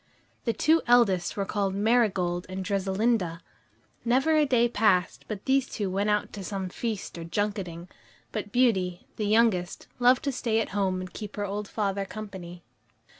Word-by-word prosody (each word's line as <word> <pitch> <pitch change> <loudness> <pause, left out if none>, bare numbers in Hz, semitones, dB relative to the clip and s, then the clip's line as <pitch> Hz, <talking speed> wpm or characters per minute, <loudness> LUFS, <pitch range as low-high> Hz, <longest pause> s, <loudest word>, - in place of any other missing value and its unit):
The 230 - +1
two 320 +6 +3
eldest 205 -8 +3
were 200 - 0
called 195 -1 -1
Marigold 200 -5 +1
and 190 0 -4
Dressalinda. 195 -2 0 0.6
Never 265 +6 +3
a 305 -1 +4
day 240 -3 +4
passed 205 -6 +1
but 210 -2 -6
these 265 0 +2
two 200 -3 -3
went 200 +3 0
out 210 0 0
to 200 - -6
some 190 0 -4
feast 210 -3 -4
or - - -5
junketing; 180 -1 -3 0.4
but 205 - -4
Beauty, 195 -8 +1
the 210 - -1
youngest, 210 -5 +2
loved 250 +3 +5
to 280 - 0
stay 230 -3 0
at 225 - -1
home 190 -2 0
and 185 -1 -8
keep 210 -2 -7
her 205 - -2
old 205 +1 -4
father 200 -2 -1
company. 190 -4 -8
205 Hz, 170 wpm, -27 LUFS, 185-230 Hz, 0.6 s, loved